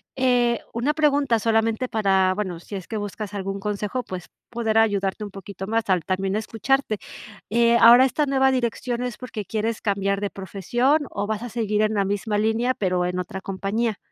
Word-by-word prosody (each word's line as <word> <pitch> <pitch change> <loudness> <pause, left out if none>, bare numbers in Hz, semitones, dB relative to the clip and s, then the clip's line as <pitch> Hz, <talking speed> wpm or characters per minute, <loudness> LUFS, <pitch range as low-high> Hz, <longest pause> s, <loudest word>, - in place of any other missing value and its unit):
Eh, 245 -2 +2
una 245 +6 0
pregunta 285 -5 +3
solamente 225 +2 +1
para, 190 -3 +2
bueno, 185 -5 -3
sí 200 - -9
es 185 -3 -6
que 220 - -4
buscas 205 0 -5
algún 195 0 -3
consejo, 210 +4 -3
pues 180 -2 -7 0.2
poder 225 -2 +1
ayudarte 200 -2 +1
un 205 - -5
poquito 195 0 -8
más 225 +1 +1
al 180 -3 +2
también 190 +1 -1
escucharte. 225 +2 0 0.5
Eh, 235 +1 +4
¿ahora 240 +3 +9
esta 275 +3 +1
nueva 265 -1 +3
dirección 245 0 -1
es 245 -3 -4
porque 225 -5 -6
quieres 220 +1 -2
cambiar 200 -1 0
de 205 - -2
profesión 240 - 0
o 205 0 -3
vas 220 +1 -2
a 245 - -5
seguir 215 -2 0
en 215 0 +1
la 200 - +2
misma 205 +2 -1
línea, 225 +4 +1
pero 180 -2 0
en 180 +1 -2
otra 180 +1 -5
compañía? 200 +3 -2
215 Hz, 185 wpm, -23 LUFS, 195-235 Hz, 0.5 s, ahora